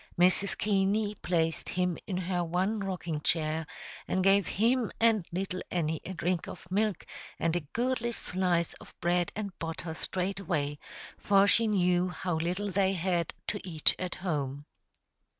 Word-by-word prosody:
Mrs. 185 +2 +4
Keaney 205 +1 +1
placed 165 -2 0
him 180 -1 0
in 185 - -2
her 180 -1 -1
one 185 +6 0
rocking 175 -6 -3
chair, 155 0 0 0.4
and 185 - +1
gave 195 0 +5
him 235 +2 +3
and 225 -6 +3
little 185 +1 -3
Annie 160 -3 -1
a 190 - -6
drink 175 0 -1
of - - -9
milk 205 -1 0 0.3
and 165 0 0
a - - +2
goodly 235 - -1
slice 180 -5 0
of - - -15
bread 175 0 +1
and 200 -3 -4
butter 165 0 -4
straightway, 180 -5 -2 0.4
for 200 -1 +5
she 225 +2 +4
knew 180 -3 +3
how 180 0 -3
little 180 +5 -1
they 190 0 +2
had 175 -1 -1
to 205 - -2
eat 160 -5 +3
at 185 -1 -3
home. 145 -4 -2
180 Hz, 150 wpm, -30 LUFS, 170-200 Hz, 0.4 s, gave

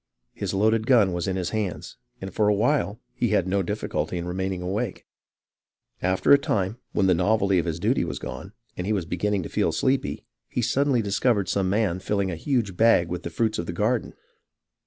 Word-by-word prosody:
His - - -3
loaded 110 +3 +2
gun 110 -8 +5
was 85 0 -2
in 95 - -1
his 90 -2 -2
hands, 105 -5 -3 0.2
and 95 0 -7
for 105 -2 +2
a 105 - +4
while 115 -1 +1
he 120 - 0
had 100 -4 +2
no 100 +1 +1
difficulty 95 -1 -2
in 85 - -4
remaining 95 0 -3
awake. 100 +4 -3 1.0
After 95 +1 +2
a 140 - +9
time, 105 -3 -1
when 95 - +1
the 95 - +5
novelty 100 +1 +2
of 85 - -2
his 85 0 -2
duty 110 +6 +1
was 85 - -4
gone, 95 - -7 0.2
and 90 - -4
he 110 - +1
was 95 -5 -1
beginning 95 +3 -1
to - - -7
feel - - +1
sleepy, 135 +1 -1 0.2
he 120 - -1
suddenly 135 -1 +2
discovered 100 -1 +1
some 95 -2 +1
man 100 -3 +1
filling 100 0 -1
a - - -3
huge 110 - -1
bag 110 -5 +4
with 90 0 -3
the 85 - -5
fruits 110 +5 -1
of 85 - -3
the - - -3
garden. - - -1
100 Hz, 205 wpm, -25 LUFS, 90-110 Hz, 1.0 s, a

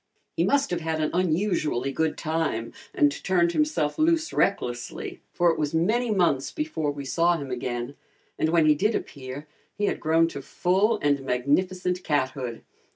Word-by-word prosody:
He - - +2
must 280 -4 +2
have 175 -1 -1
had 160 -1 -2
an 155 - 0
unusually 165 -7 0
good 160 +2 -1
time 155 -8 -2 0.2
and 145 - +3
turned 175 -2 +2
himself 300 - 0
loose 320 0 +2
recklessly, 120 -11 -1
for 175 -1 +3
it 165 - -3
was 150 +1 -1
many 225 +9 +1
months 175 -10 +1
before 305 - -2
we 140 -1 -5
saw 170 +6 +2
him 140 -4 -6
again, 120 +1 -3 0.4
and 155 - +2
when 165 -1 +4
he 155 - +6
did 210 +9 +1
appear 135 +1 -6 0.3
he 205 - +1
had - - -1
grown 165 +1 +3
to 140 - -7
full 195 +10 +1
and 145 -1 +2
magnificent 180 +8 0
cathood. 130 -5 -2
160 Hz, 165 wpm, -26 LUFS, 140-185 Hz, 0.4 s, he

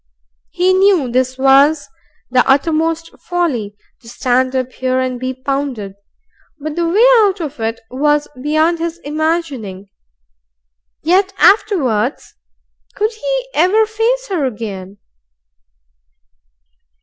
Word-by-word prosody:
He 370 +1 +1
knew 375 -9 +3
this 255 +1 0
was 275 +3 +4 0.4
the 250 0 +4
uttermost 325 +4 +1
folly, 275 - -2 0.2
to 230 - -15
stand 255 +2 0
up 255 -1 -1
here 255 0 -1
and 255 -1 -2
be 255 +1 -3
pounded, 260 -6 -3 0.7
but 300 +1 -5
the 340 -1 0
way 420 +8 +4
out 405 -3 +2
of 300 -5 -6
it 225 0 -3
was 295 +3 +1
beyond 310 +4 +1
his 335 0 -3
imagining. 290 - -3 1.1
Yet 375 +4 +2
afterwards? 280 - +2 0.6
Could 430 +3 -1
he - - -3
ever 385 +7 +3
face 455 +3 -1
her 355 -7 -1
again? 205 -6 -5
295 Hz, 115 wpm, -16 LUFS, 255-350 Hz, 1.1 s, was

